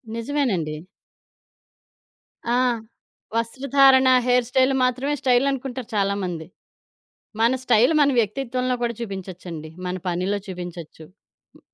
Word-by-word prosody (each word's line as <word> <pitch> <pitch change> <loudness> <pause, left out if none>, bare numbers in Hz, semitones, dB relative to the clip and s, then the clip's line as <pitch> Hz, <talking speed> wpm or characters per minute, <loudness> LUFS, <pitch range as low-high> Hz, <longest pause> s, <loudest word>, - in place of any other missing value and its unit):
నిజమేనండి. 230 - -1 1.8
ఆ! - - +3 0.8
వస్త్రధారణ, 265 +3 +4 0.2
హెయిర్ 245 -1 +3
స్టైల్ 260 +1 +3
మాత్రమే 255 +3 0
స్టైలనుకుంటారు 260 -1 0
చాలామంది. 195 -5 -1 1.0
మన 230 +2 +4
స్టైల్ 245 +4 +4
మన 285 - +5
వ్యక్తిత్వంలో 250 +3 -1
కూడా 235 0 0
చూపించొచ్చండి. 180 -6 -7 0.2
మన 180 0 -2
పనిలో 180 +3 -1
చూపించొచ్చు. 175 -3 -8 0.5
హ్మ్. - - -19
235 Hz, 90 wpm, -23 LUFS, 185-260 Hz, 1.8 s, మన